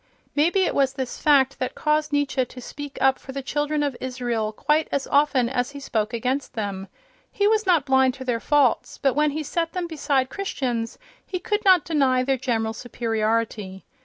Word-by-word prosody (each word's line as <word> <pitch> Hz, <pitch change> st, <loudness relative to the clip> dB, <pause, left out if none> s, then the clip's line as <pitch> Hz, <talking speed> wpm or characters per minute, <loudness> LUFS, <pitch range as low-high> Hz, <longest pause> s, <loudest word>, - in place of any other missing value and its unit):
Maybe 340 Hz, +6 st, +3 dB
it -, -, 0 dB
was 270 Hz, -1 st, +2 dB
this 260 Hz, -3 st, -5 dB
fact 275 Hz, -2 st, +4 dB
that 255 Hz, -, -3 dB
caused 300 Hz, 0 st, 0 dB
Nietzsche 285 Hz, -2 st, +1 dB
to 250 Hz, -, -10 dB
speak 285 Hz, +3 st, -8 dB
up 265 Hz, 0 st, +3 dB
for 265 Hz, -, -10 dB
the 275 Hz, 0 st, -4 dB
children 295 Hz, +2 st, -1 dB
of 285 Hz, -3 st, -1 dB
Israel 245 Hz, -4 st, -2 dB
quite 300 Hz, +7 st, +1 dB
as 280 Hz, -1 st, -1 dB
often 285 Hz, -4 st, +3 dB
as 245 Hz, 0 st, -1 dB
he 285 Hz, 0 st, -9 dB
spoke 220 Hz, -5 st, -2 dB
against 255 Hz, +4 st, -2 dB
them. 200 Hz, -3 st, -4 dB, 0.4 s
He 405 Hz, -1 st, +1 dB
was 430 Hz, -1 st, +2 dB
not 335 Hz, -7 st, +4 dB
blind 265 Hz, -1 st, +3 dB
to 260 Hz, -1 st, -8 dB
their 240 Hz, -2 st, 0 dB
faults, 285 Hz, -2 st, +2 dB
but 270 Hz, -2 st, +1 dB
when 300 Hz, +3 st, +2 dB
he 305 Hz, +2 st, -3 dB
set 330 Hz, +3 st, -2 dB
them 360 Hz, -1 st, -2 dB
beside 290 Hz, -5 st, 0 dB
Christians 245 Hz, -, -3 dB, 0.3 s
he 370 Hz, -, -4 dB
could 415 Hz, +4 st, -2 dB
not 370 Hz, -5 st, +6 dB
deny 270 Hz, -5 st, +2 dB
their 270 Hz, +1 st, +1 dB
general 225 Hz, -3 st, -1 dB
superiority. 225 Hz, -4 st, -2 dB
270 Hz, 190 wpm, -24 LUFS, 245-300 Hz, 0.4 s, not